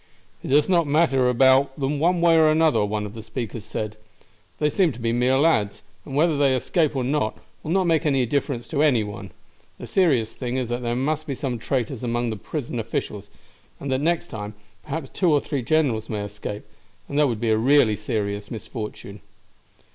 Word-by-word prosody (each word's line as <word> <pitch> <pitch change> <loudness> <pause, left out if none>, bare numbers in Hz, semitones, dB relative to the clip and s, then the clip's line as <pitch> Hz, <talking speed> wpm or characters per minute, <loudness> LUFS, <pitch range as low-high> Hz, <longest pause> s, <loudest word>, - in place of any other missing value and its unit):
"It - - -7
does 145 +2 +4
not 170 -4 +3
matter 140 -4 +3
about 135 +2 +4
them 140 +1 -1
one 175 +2 +2
way 170 -1 +5
or 160 -1 +5
the 155 +1 +2
other," 155 -9 +3
one 105 0 -2
of 105 - -8
the 115 - -8
speakers 115 -1 -6
said. 110 0 -5 0.6
"They 150 - +1
seem 170 +2 +2
to 120 - -11
be 115 -1 0
mere 125 +2 +2
lads, 115 -9 +1 0.2
and 135 - -7
whether 155 0 +2
they 135 -2 +3
escape 155 +4 0
or 130 - 0
not 130 -4 -1 0.2
will - - -7
not 190 +2 +2
make 165 -2 +2
any 135 -5 +2
difference 130 -1 -2
to 145 -2 0
any 135 -8 +3
one. 105 0 -7 0.5
The - - -8
serious 135 - +2
thing 125 0 -4
is 125 -3 -2
that 120 +1 -2
there 120 -1 -1
must 155 +5 -1
be 140 - -2
some 125 -3 -3
traitors 125 +1 -2
among 120 -1 -1
the - - -3
prison 120 +2 -5
officials, 105 -2 -4 0.5
and 140 - -4
that 130 +1 0
next 170 +2 0
time, 105 -2 -6 0.3
perhaps 150 +1 -5
two 180 -4 +1
or 145 - +4
three 140 -1 -3
generals 125 -4 +1
may 105 -2 -3
escape, 105 0 -7 0.4
and 145 - -1
that 150 - +5
would 115 -4 -2
be 115 -1 0
a - - +4
really 120 -2 +4
serious 100 -2 -3
misfortune." 105 -2 -7
130 Hz, 210 wpm, -23 LUFS, 110-150 Hz, 0.6 s, way